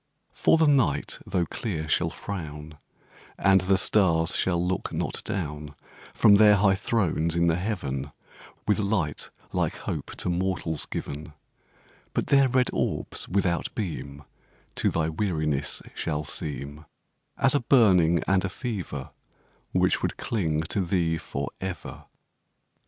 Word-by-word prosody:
The 160 0 +5
night 125 - +2
tho' 90 -2 0
clear 80 -3 -4
shall - - +2
frown 75 -5 -7 0.6
And 95 -1 +4
the 95 +1 +3
stars 85 -5 +3
shall 90 -2 +1
not 90 +2 -1
look - - -3
down 75 -5 -4 0.4
From 100 -1 +6
their 105 -1 +7
high 100 0 +4
thrones 95 -5 0
in 85 0 +3
the 85 -1 +3
Heaven, 75 -8 -3 0.6
With 105 +1 +3
light 100 -8 -1 0.2
like - - 0
Hope - - -5
to - - -4
mortals 90 -3 -1
given 75 +2 -6 0.8
But - - +1
their 135 -1 +6
red 125 0 +2
orbs, - - -2
without 90 -2 0
beam, 75 -8 -5 0.5
To - - +2
thy 80 -1 0
weariness 80 -5 -1
shall 75 -1 -2
seem 75 +1 -4 0.5
As 135 -1 +3
a 145 - +3
burning 95 - +4
and 95 -1 +3
a 95 - -1
fever 95 - -5 0.6
Which - - +2
would - - -2
cling 80 -9 -1
to 80 +5 -1
thee 85 -2 0
forever. 95 +2 -6
90 Hz, 130 wpm, -26 LUFS, 80-100 Hz, 0.8 s, their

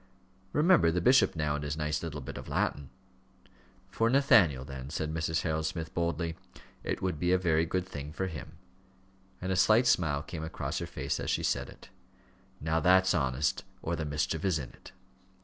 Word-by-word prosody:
Remember 160 - +4
the 85 +2 +1
bishop 125 +5 +4
now 75 -2 0
and 75 0 -3
his 75 +1 -3
nice 75 -1 -1
little 75 -3 -5
bit 65 - -7
of - - -8
Latin." 70 -2 -1 1.0
"For 115 +3 +1
Nathaniel 100 - +4
then," 65 -1 -7
said 80 0 -3
Mrs. 80 0 0
Harold 80 -1 -1
Smith, 80 -1 -5
boldly. 85 -1 -1 0.5
"It - - -3
would 90 -5 -1
be 90 0 +1
a 95 - +5
very 85 -3 +1
good 90 +2 -1
thing 75 -4 -7
for 95 +4 -3
him." 85 -4 -7 0.9
And 95 +1 -3
a - - +1
slight 110 +6 +5
smile 75 -11 +2
came 80 -1 -6
across 80 - -4
her - - -4
face - - -3
as - - -3
she - - 0
said - - 0
it. - - -15 0.7
"Now 80 +1 0
that's 95 +3 +4
honest, 65 +1 0 0.2
or 85 - -1
the 80 - -3
mischief 75 +2 -2
is 95 -5 +2
in 65 -4 -6
it." - - -15
80 Hz, 190 wpm, -30 LUFS, 75-90 Hz, 1.0 s, a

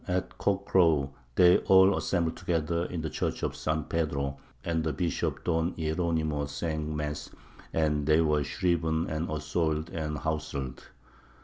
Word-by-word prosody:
At 90 0 -2
cock 100 0 0
crow 80 -7 +3 0.2
they 90 -1 +7
all 95 +1 +6
assembled 85 -3 0
together 85 0 -1
in 85 -3 -4
the 80 - -3
Church - - -2
of - - -1
St. 80 -1 -2
Pedro, 70 -4 -1 0.3
and 80 -1 0
the 80 - 0
Bishop 90 -2 -2
Don 80 +1 0
Hieronymo 80 -2 0
sang 75 +1 -3
mass, 75 0 -3 0.4
and 75 -2 +1
they 80 +1 +5
were 75 -2 +2
shriven 80 -1 0
and 80 +2 -2
assoyled 75 +1 -1
and 75 -2 -3
howselled. 70 -5 -3
80 Hz, 145 wpm, -29 LUFS, 75-85 Hz, 0.4 s, they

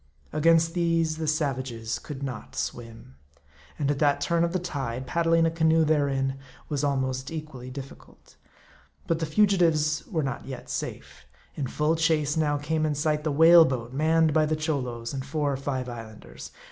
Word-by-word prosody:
Against 165 +1 +3
these, 165 -2 +1
the 160 -1 -3
savages 130 -7 -2
could 140 -2 -8
not 125 -6 -6
swim. 115 - -6 0.6
And 145 -2 0
at 140 - -2
that 145 -2 +3
turn 170 +4 +1
of 170 - 0
the 185 - 0
tide, 135 -8 -4
paddling 165 +3 +2
a 165 - +2
canoe 160 0 +3
therein 135 -3 0 0.3
was 150 -2 -1
almost 130 -2 -1
equally 150 -6 -7
difficult. 135 +1 -11 0.7
But 165 - 0
the 160 - -2
fugitives 165 -5 +2
were 160 -6 -1
not 135 -3 -4
yet 130 -2 -7
safe. - - -6 0.3
In 140 - -3
full 150 +5 +1
chase 155 -3 +1
now 150 -2 +1
came 155 +2 -1
in 155 -1 0
sight 150 +1 0
the 155 - 0
whale 165 +3 +8
boat 125 -4 -3
manned 160 +2 +3
by 155 0 +3
the 155 - 0
Cholos, 125 -7 -3
and 135 -1 -4
four 145 0 -1
or - - -2
five 130 -2 -3
Islanders. 115 -3 -9
150 Hz, 170 wpm, -26 LUFS, 135-160 Hz, 0.7 s, whale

